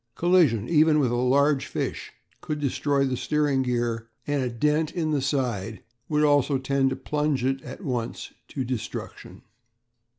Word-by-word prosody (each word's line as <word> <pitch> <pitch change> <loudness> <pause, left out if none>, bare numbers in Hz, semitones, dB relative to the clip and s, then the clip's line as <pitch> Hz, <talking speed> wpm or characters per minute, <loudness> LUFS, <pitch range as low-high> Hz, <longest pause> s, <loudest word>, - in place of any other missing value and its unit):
Collision, 165 - +3
even 155 -1 +4
with 135 -5 +2
a - - 0
large 135 +3 +2
fish, - - -4 0.3
could 150 -1 -3
destroy 140 0 +1
the 130 -1 -1
steering 145 +1 +1
gear, 120 -2 -1 0.2
and 145 -1 0
a 125 - -1
dent 150 +6 0
in 160 -3 0
the 145 -2 +1
side 120 -6 -2 0.3
would 150 -1 +2
also 145 -2 +3
tend 135 0 +1
to 130 - -2
plunge 150 -1 -1
it 135 0 0
at 195 - -9
once 125 -6 -4
to 135 - -4
destruction. 125 -2 -6
135 Hz, 160 wpm, -25 LUFS, 125-150 Hz, 0.3 s, even